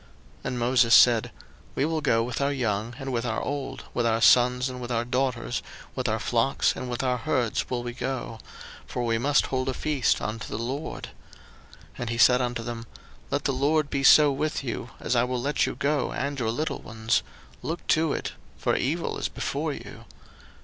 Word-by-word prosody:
02:010:009 - - -20
And 125 - -2
Moses 120 -1 +5
said, 120 -3 +6 0.4
We 135 - +1
will 160 0 -1
go 115 -6 +2
with 125 +3 -3
our 140 +1 +2
young 115 -3 -1
and 135 -1 -5
with 115 -1 0
our 115 -2 -1
old, 140 -1 -4
with 120 -1 +1
our 115 0 +2
sons 125 +2 +5
and 125 -1 -6
with 120 - -6
our 120 0 0
daughters, 125 -1 -1 0.3
with - - -2
our - - +1
flocks - - +1
and 125 - -5
with 120 +1 -2
our 125 -1 +1
herds 120 -1 -1
will 125 -2 -2
we 120 0 -5
go; 125 -2 -4 0.5
for 125 - -3
we 115 -1 +1
must 140 +4 +3
hold 130 0 -1
a 130 - -2
feast 150 -5 +1
unto 110 +1 -4
the - - -4
LORD. 130 +7 -4 0.6
02:010:010 - - -16 0.2
And 120 - -3
he 115 - -2
said 125 +1 +6
unto 120 -1 -2
them, 115 0 -6 0.4
Let - - -1
the 135 - +1
LORD 145 +3 +1
be 140 - 0
so 145 +1 +7
with 150 +1 -2
you, 120 -2 -4
as 125 - -1
I 120 - +4
will 125 0 -1
let 145 +4 +1
you - - -4
go, 145 0 0
and 140 +1 -3
your 115 -3 0
little 150 +8 -2
ones: 110 0 0 0.4
look 165 +2 -4
to 160 -1 +3
it; - - -3 0.3
for - - 0
evil - - -1
is - - -1
before - - -2
you. - - -10
125 Hz, 205 wpm, -26 LUFS, 120-140 Hz, 0.6 s, so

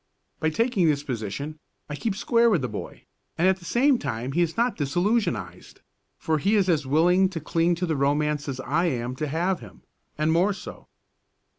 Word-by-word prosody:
By 160 - +1
taking 215 0 +1
this 145 -2 +1
position 140 +4 -5 0.3
I 145 - -5
keep 205 +6 -2
square 235 +2 +3
with 180 - +1
the - - 0
boy, 105 -3 -7 0.3
and 175 - +3
at 190 0 +3
the 175 - -14
same 255 +5 +3
time 120 - -3
he 170 - +1
is 170 +3 -1
not 240 +1 +1
disillusionised, 145 - -1 0.4
for 160 -1 0
he 200 +7 +2
is 200 -3 +3
as 155 -5 +1
willing 180 +6 +4
to 180 -3 -5
cling 165 +2 +1
to 180 +2 -2
the 160 -2 -1
romance 145 +1 0
as 130 -1 -4
I 165 +6 0
am 125 -5 -2
to 155 - -2
have 175 +6 0
him 110 -5 -14 0.3
and 155 +1 +1
more 180 +5 +3
so. 195 - -10
160 Hz, 195 wpm, -25 LUFS, 140-190 Hz, 0.4 s, willing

